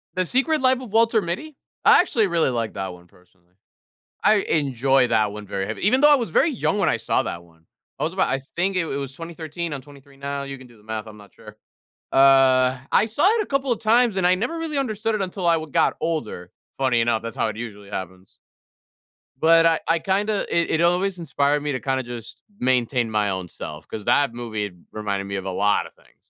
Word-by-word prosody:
"The 185 0 0
Secret 270 - +1
Life 260 0 +3
of 240 - -10
Walter 225 0 +3
Mitty?" 275 - -5 0.3
I - - +8
actually 230 - +2
really 170 -5 +1
like 115 -3 -2
that 95 -2 -4
one 90 0 -15
personally. 90 0 -28 0.7
I 215 +2 +5
enjoy 135 - +2
that 105 -3 +1
one 105 0 -8
very 100 -1 -3
heavy. 110 - -6
Even 255 +5 +4
though 295 +1 +7
I - - +7
was 235 -9 -3
very 320 - +3
young 230 -6 -1
when 195 - +2
I - - +2
saw 115 - 0
that 85 - -6
one. 80 -1 -25 0.3
I - - -5
was - - 0
about - - +1
I 135 - 0 0.2
think 185 +2 +1
it - - +3
it 140 - -4
was 140 -1 -5
2013. 165 +1 -6
I'm 140 - -4
23 140 0 -17
now. 140 0 -4
You 140 0 -7
can 130 - -13
do 120 -1 -19
the 105 - -22
math, 110 0 -5
I'm 110 - -11
not 105 -1 -16
sure. 105 0 -14 0.6
Uh, 135 -1 +5
I - - +4
saw 230 - +2
it 445 +2 +3
a - - -3
couple 275 -4 -1
of 235 - 0
times, 230 0 +3
and 180 -2 +3
I 180 - +4
never 240 - -3
really 325 -3 -3
understood 225 -4 -1
it 210 - -2
until 185 -1 -4
I 170 - +5
w 160 -1 -5
got - - +2
older. 115 - -4 0.3
Funny 130 -3 +2
enough, 115 -1 +1
that's 115 -1 -7
how - - 0
it 110 -1 -5
usually 105 -4 -8
happens. 95 -1 -8 1.0
But 165 +2 +5
I 165 -1 +3
I 165 +1 +3
kinda 200 +4 0
it 170 0 +1
it 160 - +1
always 180 +2 +1
inspired 145 -2 0
me 150 - -2
to 130 - -3
kinda 130 +2 -1
just 120 -2 -9 0.2
maintain 125 -2 +1
my 105 -2 +1
own 95 -2 -4
self 75 -1 -9
'cause 105 -2 -7
that 140 0 +2
movie 110 -4 -4 0.2
reminded 100 -2 -3
me 100 0 -4
of 95 0 -5
a - - -2
lot 105 +2 +1
of - - -16
things. - - -27
140 Hz, 235 wpm, -23 LUFS, -, 1.0 s, I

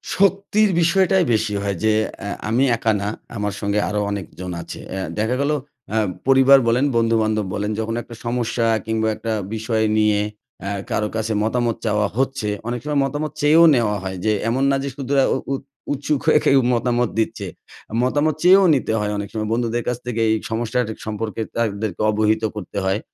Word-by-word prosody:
শক্তির 200 +2 +3
বিষয়টাই 190 +2 +3
বেশি 110 -1 0
হয় 100 -2 -2
যে, 110 0 +4 0.3
অ্যা 100 0 -5 0.2
আমি 120 +4 +2
একা 110 0 +1
না 100 - -2 0.3
আমার 105 -1 -2
সঙ্গে 100 +1 0
আরও 105 0 -1
অনেকজন 90 -2 -6
আছে। - - -8
অ্যা 95 0 -3 0.2
দেখা 110 +4 +1
গেলো 150 +2 +1 0.4
হ - - -5 0.3
পরিবার 135 +1 +7
বলেন, 125 +4 +3
বন্ধু-বান্ধব 110 -2 +1
বলেন। 105 0 -2
যখন 115 +1 -2
একটা 115 0 -11
সমস্যা 120 -1 -1 0.2
কিংবা 110 0 0
একটা 110 +1 -4 0.2
বিষয় 110 0 0
নিয়ে 105 -1 +3 0.4
অ্যা 100 - -4 0.2
কারো 105 - 0
কাছে 110 0 -1
মতামত 120 0 0
চাওয়া 105 -1 +1
হচ্ছে। 135 -5 0 0.2
অনেক 120 0 -2
সময় 150 -1 0
মতামত 150 +2 -3
চেয়েও 155 +3 +6
নেওয়া 110 -4 +1
হয়। 95 -1 -4
যে 110 - +3 0.2
এমন 130 +3 0
না - - +3
যে 140 - -2
শুধু 140 -1 -4 0.4
উৎ 135 - -3 0.3
উৎসুক 145 +1 -1
হয়ে 155 - +6
কেউ 135 - +5
মতামত 120 0 +1
দিচ্ছে। 110 -3 -2 0.6
মতামত 145 +4 +1
চেয়েও 190 +2 +7
নিতে 125 -4 -1
হয় 105 0 -1
অনেক 105 - -4
সময় 110 -1 -3
বন্ধুদের 120 0 -1
কাছ 125 - 0
থেকে। 115 -2 -2
এই 110 - +3 0.2
সমস্যা 115 +2 -1 0.3
সম্পর্কে 110 +1 -4
তাদেরকে 110 -4 -2
অবহিত 110 +1 +1
করতে 100 -2 -7
হয়। 95 +2 +1
115 Hz, 175 wpm, -21 LUFS, 105-135 Hz, 0.6 s, পরিবার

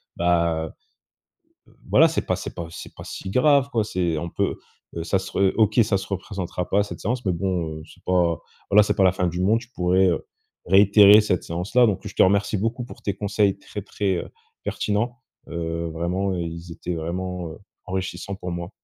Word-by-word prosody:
bah 85 -2 +1 1.2
voilà, - - +7
c'est - - -2
pas - - +1
c'est - - -7
pas 85 - -4
c'est - - -10
pas - - -9
si - - -7
grave 140 +5 +4
quoi. 115 -3 +1
C'est 90 -5 -1
on 85 +3 -3
peut, - - -1 0.4
heu 85 - -3
ça 95 +3 +1
se 95 0 -8
re 95 -1 +3
OK, 110 -2 +3
ça 105 -2 +1
se 95 - -7
représentera 95 -2 -4
pas 100 - +3
cette 105 - -8
séance. 120 +3 -2
Mais 95 - +2
bon, 85 -3 -2
heu, - - -11
c'est - - -18
pas 85 -3 +2 0.3
voilà 105 +1 +7
c'est - - 0
pas 95 - +3
la 95 - +6
fin 90 0 -1
du 90 +1 -2
monde. 105 +5 +3
Je 120 - -13
pourrais, 90 +1 +3
heu, 85 -3 0 0.4
réitérer 100 +2 +7
cette 100 -4 0
séance 90 +6 -5
là. 125 -1 +7
Donc 105 -5 -1
je - - -10
te - - +6
remercie 100 +2 +2
beaucoup 115 +4 -2
pour - - -12
tes 100 - -2
conseils 100 -1 +1
très, 105 - -7
très, 100 -1 -1
heu, - - -5 0.3
pertinents. 115 +4 -1 0.3
Heu, 85 0 -3
vraiment 90 +4 -1
ils 85 0 -5
étaient 85 +1 -4
vraiment, 90 +1 -4
heu, 80 - -10 0.3
enrichissants 95 +1 -4
pour 90 -2 -6
moi. 85 0 -4
95 Hz, 205 wpm, -24 LUFS, 85-105 Hz, 1.2 s, voilà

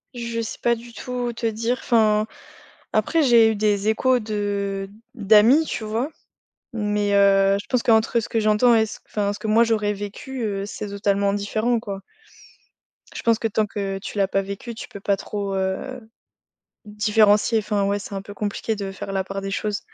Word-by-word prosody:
Je 235 -1 -3
sais 225 - -5
pas 235 - +4
du 235 +1 -12
tout 245 -1 -4
te 230 - -5
dire 230 +2 0
enfin. 215 -3 +3 0.7
Après 330 - +2
j'ai 230 -3 +6
eu 220 - -2
des 205 0 +1
échos 255 +3 +3
de 200 -2 -3 0.3
d'amis, 220 +7 +5
tu 230 - -4
vois? 225 +6 -2 0.6
Mais, 210 -2 0
heu, 195 0 +5
je - - -12
pense 250 -2 +1
qu'entre 225 +1 +3
ce - - -6
que 225 - 0
j'entends 215 +3 +4
et 220 - +4
ce - - -9
enfin, 205 -1 -1
ce - - -8
que 220 - -6
moi 225 +2 +5
j'aurais 215 -2 +1
vécu, 230 +6 -6
heu, 200 -2 -2
c'est 210 0 -6
totalement 200 0 0
différent, 215 +4 0
quoi. 200 -3 -6 1.2
Je - - -6
pense 230 -1 +3
que 225 - 0
tant 215 0 0
que 200 -1 -4
tu 205 - -7
l'as 195 - +3
pas 195 0 0
vécu, 200 +4 -7
tu - - -8
peux 200 - -10
pas 200 0 0
trop, 200 0 -4
heu, 190 +7 -2 0.9
différencier 210 +1 +3
enfin, 205 -2 -1
ouais, 200 +1 0
c'est 200 - -8
un 195 - -3
peu 205 +1 -10
compliqué 210 +2 -3
de 200 -2 -5
faire 195 0 -7
la 190 -1 -1
part 195 +1 -5
des 195 0 -4
choses. 205 +1 -2
210 Hz, 195 wpm, -23 LUFS, 200-230 Hz, 1.2 s, j'ai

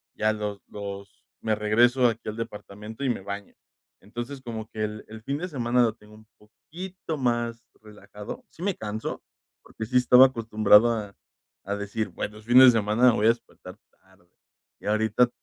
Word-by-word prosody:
ya 110 0 +2
los 105 -2 -5
los 100 -1 -9 0.2
me 110 -1 0
regreso 120 +4 +3
aquí 115 -2 -3
al 110 - -6
departamento, 105 +2 -7
y 130 - +1
me - - -1
baño. 100 +1 -7 0.5
Entonces, 120 +6 -7
como 110 -3 -6
que 110 -1 -4
el 105 0 -7
el 110 0 -10
fin 140 +3 -2
de 180 - -3
semana, 125 -3 +1
lo 115 -2 +1
tengo 105 -2 -18
un 110 0 -17
poquito 165 - -8
más 120 -2 -1 0.2
relajado. 105 -1 -10
Sí 170 - -10
me 200 0 +1
canso, 110 +1 -5 0.4
porque, 110 - -7
sí 125 +3 +1
estaba 125 +1 +7
acostumbrado 110 -2 +4
a 105 -4 -4 0.5
a 100 - -2
decir, 105 +2 -3
bueno, 105 +1 -6
es 110 - -18
fin 120 +2 +4
de 130 -1 +10
semana 115 +2 +3
voy 110 0 +2
a - - +7
despertar 120 0 -4
tarde. 95 -2 -28 0.5
Y - - -10
ahorita, 110 +3 +2
110 Hz, 180 wpm, -26 LUFS, 105-120 Hz, 0.5 s, de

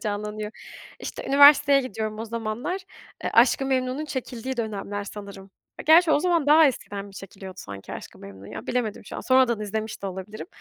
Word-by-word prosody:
canlanıyor. 210 0 -4 0.5
İşte, - - -7
üniversiteye 285 0 +7
gidiyorum 215 -4 -4
o 225 - -4
zamanlar. 230 - -3 0.4
Eee, - - -1
Aşk-ı 250 +3 +4
Memnu'nun 260 +2 -1
çekildiği 260 -3 -5
dönemler 205 -3 -4
sanırım. 200 -1 -10 0.4
Gerçi, 320 +1 +7
o - - +5
zaman 340 -4 +1
daha 310 +2 +7
eskiden 205 -6 -3
mi 200 - -14
çekiliyordu 195 -1 -10
sanki 100 - -9
Aşk-ı - - -9
Memnu, 100 0 -12
ya? 110 - -8
Bilemedim 230 -5 -2
şu - - -8
an. - - -4
Sonradan 255 -4 +3
izlemiş 215 +1 -4
de - - -3
olabilirim. 190 - -7
220 Hz, 170 wpm, -25 LUFS, 205-265 Hz, 0.5 s, üniversiteye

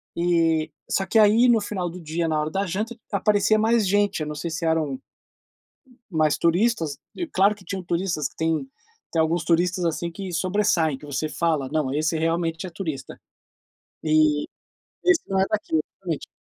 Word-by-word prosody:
e, 165 -2 +2 0.2
só 195 - +1
que - - +1
aí, 215 +4 +6
no 235 -2 +5
final 190 -4 -3
do 180 - -9
dia, 165 0 -2
na 155 -1 +1
hora 150 +1 -2
da 195 +3 0
janta, 215 +7 -3 0.2
aparecia 205 +1 +3
mais 220 -1 +3
gente, 205 -1 +2
eu 150 - -2
não 150 - -5
sei 165 +3 -4
se 165 +1 -3
eram 155 -5 0 1.1
mais 155 -3 +2
turistas 170 -4 +1 0.2
e, 350 - -3
claro 200 - +3
que 200 -2 -18
tinham 190 -1 -4
turistas 170 -5 -1
que - - -27
tem 160 +8 0 0.5
tem 165 - +3
alguns 160 +1 0
turistas, 175 +2 +1
assim, 170 +1 -2
que 190 +1 -6
sobressaem, 170 -4 +1
que 150 - -12
você 145 +2 -2
fala: 155 -4 0
"Não, 150 -4 0
esse 155 +2 0
realmente 165 +1 -1
é - - -7
turista". 160 -5 -6 0.8
E 155 -1 +3 0.6
"esse 365 -2 +5
não 195 - +1
é 190 - +4
daqui", 210 -6 0 0.2
realmente. 170 -6 -4
170 Hz, 180 wpm, -24 LUFS, 155-195 Hz, 1.1 s, aí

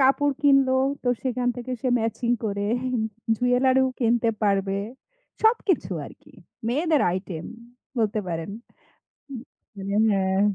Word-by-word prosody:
কাপড় 275 +2 +4
কিনলো, 275 -2 +5 0.3
তো 245 - -1
সেখান 250 -1 -1
থেকে 245 +1 -5
সে 260 - 0
ম্যাচিং 230 +1 -1
করে 200 -1 -1 0.7
জুয়েলারিও 255 +2 +3
কিনতে 235 -1 +2
পারবে। 195 -1 +1 0.6
সবকিছু 390 - +2
আর - - -10
কি, - - -19 0.4
মেয়েদের 305 +4 +2
আইটেম, 180 -3 -4 0.5
বলতে 215 -1 +1
পারেন। 165 +1 -3 0.8
হুম। 265 -5 -7 0.3
মানে 200 0 -4 0.2
হ্যাঁ। 190 -1 +1
240 Hz, 120 wpm, -25 LUFS, 200-265 Hz, 0.8 s, কিনলো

